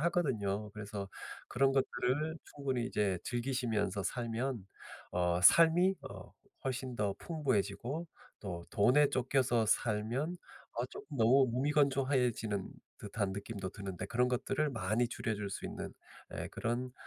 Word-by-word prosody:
하거든요. 110 - 0
그래서 105 -2 -5 0.4
그런 135 +2 +3
것들을 140 +3 0
충분히 130 -4 -2
이제 100 -3 0
즐기시면서 120 -6 -1
살면 120 +2 -2 0.5
어 90 0 +2
삶이 170 - +7 0.2
어 95 -2 -10 0.3
훨씬 130 -1 -3
더 100 -3 0
풍부해지고 140 - -1 0.3
또 85 -4 -5
돈에 140 +8 +5
쫓겨서 130 -3 +2
살면 115 +10 0 0.4
어 120 +2 -2
쪼끔 145 +3 -9
너무 130 +3 +6
무미건조해지는 130 -6 +1 0.3
듯한 100 -1 -2
느낌도 100 -1 -5
드는데 95 -2 -6
그런 125 +3 +2
것들을 135 +4 0
많이 115 +1 0
줄여줄 105 -4 -2
수 - - -5
있는 - - -6 0.4
예 - - -4
그런 125 +2 -2
120 Hz, 280 characters per minute, -34 LUFS, 105-135 Hz, 0.5 s, 삶이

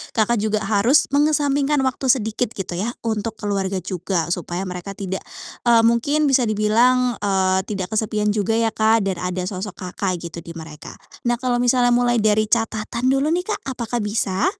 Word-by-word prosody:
Kakak 225 0 +2
juga 215 0 -1
harus 220 +8 +3
mengesampingkan 290 -1 +2
waktu 260 0 -1
sedikit 225 -2 +1
gitu 180 -2 -4
ya, 220 +4 -1
untuk 225 0 -2
keluarga 195 -2 -2
juga 180 -2 -2
supaya 175 +1 -3
mereka 185 +1 -6
tidak 190 -2 -4 0.5
eee, 230 -1 +6
mungkin 260 +7 +2
bisa 250 -4 +3
dibilang, 235 +3 +2
eee, 190 -2 +1
tidak 195 -3 -4
kesepian 215 -1 0
juga 215 +1 0
ya 225 -1 +1
Kak, 220 0 +3
dan 190 -3 -2
ada 180 0 -3
sosok 190 +1 -5
Kakak 185 0 -2 0.2
gitu, 170 - -7
di 165 +1 -10
mereka. 160 -2 -10 0.3
Nah 240 - +3
kalau 245 -1 0
misalnya 245 0 +3
mulai 240 0 +2
dari 215 0 +3
catatan 230 +2 0
dulu 275 +2 +1
nih, 355 +2 0
Kak, 430 - -3
apakah 240 -2 -3
bisa? 210 - -1
220 Hz, 175 wpm, -21 LUFS, 195-245 Hz, 0.5 s, eee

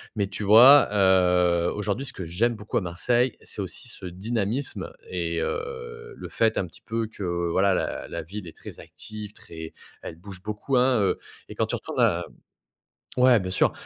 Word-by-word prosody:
Mais 100 -2 0
tu 100 +2 -6
vois, 125 +8 +8
heu, 90 -3 +4
aujourd'hui, 105 +5 -2
ce 135 - -5
que 95 - -6
j'aime 110 +9 0
beaucoup 105 0 -3
à - - +2
Marseille, 120 +8 +1
c'est - - -5
aussi 110 +6 -6
ce 95 - -8
dynamisme 110 +7 -2 0.2
et 85 -2 -2
heu, 460 -1 -5
le - - -8
fait, 110 -1 +1
un - - +1
petit 85 - -12
peu, 115 0 -2
que, 105 -2 -9 0.3
voilà, 95 +2 +3
la - - -2
la 85 - -4
ville 95 +3 -8
est 80 - -11
très - - -10
active, 105 -1 -9
très 80 -4 -10 0.3
elle - - -7
bouge 95 0 -10
beaucoup, 105 +6 -1
hein, 125 -2 +3
heu 95 - +1 0.3
et - - -8
quand - - +1
tu - - -2
retournes - - -5
à 85 +1 +3 0.9
ouais, 125 -2 +6
bien 95 -1 -4
sûr. 95 - +3
105 Hz, 190 wpm, -25 LUFS, 90-120 Hz, 0.9 s, vois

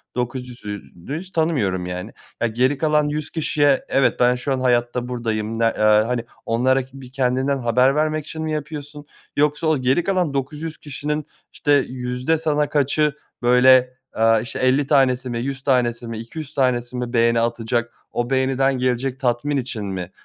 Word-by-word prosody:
900'ünü 125 - -5
hiç 185 +1 -12
tanımıyorum, 130 - 0
yani." 90 0 -6 0.3
Ya, 120 - +3
geri 130 +5 +1
kalan 150 0 +2
100 150 0 -3
kişiye, 145 -3 +1
"Evet, 135 - +2
ben 125 0 +4
şu 125 +2 -2
an 130 - -1
hayatta, 120 -1 +1
buradayım." 115 -2 -3
Ne, - - +2
eee, 115 - +2
hani, 110 +3 +3 0.2
onlara 130 +3 +2
ki 135 +1 -13
bir 125 -1 -12
kendinden 130 +1 +1
haber 125 +2 +3
vermek 155 0 0
için 160 +1 -7
mi 160 0 -2
yapıyorsun? 150 -1 -6 0.3
Yoksa 150 +2 +2
o 155 -1 +3
geri 130 +6 +1
kalan 180 -6 0
900 150 +4 -4
kişinin, 150 +1 -4 0.3
işte, 145 - -1 0.2
yüzde 125 +4 -1
sana 150 -2 0
kaçı, 150 +1 +1 0.3
böyle, 125 +1 +5 0.2
aaa, 115 0 +4
işte, 120 - -6
50 130 +2 +2
tanesi 130 -3 +2
mi, 120 -1 -2
100 135 +2 -4
tanesi 120 -3 +1
mi, 115 -1 -5
200 120 +7 -7
yüz - - -16
tanesi 125 -2 0
mi 125 0 -4
beğeni 115 -1 +3
atacak, 115 0 -1 0.2
o 120 0 -2
beğeniden 135 0 +1
gelecek 125 +1 -1
tatmin 130 +2 0
için 120 -5 -4
mi 95 -2 -5
130 Hz, 170 wpm, -21 LUFS, 120-145 Hz, 0.3 s, böyle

